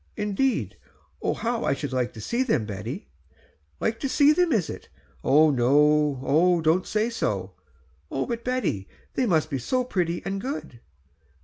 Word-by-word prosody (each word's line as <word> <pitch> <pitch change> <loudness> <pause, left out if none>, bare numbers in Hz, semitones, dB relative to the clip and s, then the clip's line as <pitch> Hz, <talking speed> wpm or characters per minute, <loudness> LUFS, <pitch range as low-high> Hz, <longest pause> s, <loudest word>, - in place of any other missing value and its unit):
"Indeed! 210 +5 0 0.4
oh - - 0
how 235 0 -2
I 140 - +1
should 140 -1 -5
like 125 -1 0
to 110 - -9
see 235 - -1
them, 220 - +1
Betty." 95 -9 -6 0.7
"Like 225 - -1
to 275 - -2
see 290 +2 +5
them, 355 0 +2
is 210 - +2
it? - - -8 0.3
Oh, 150 +3 +4
don't 165 +3 +2
say 215 +2 0
so." 95 - -2 0.6
"Oh 135 - -2
but 235 -1 -4
Betty, 230 - -1 0.3
they 255 - +1
must 160 -5 +1
be 135 - -1
so 255 - 0
pretty 175 -8 -1
and 195 0 -3
good." 260 - -5
175 Hz, 155 wpm, -25 LUFS, -, 0.7 s, see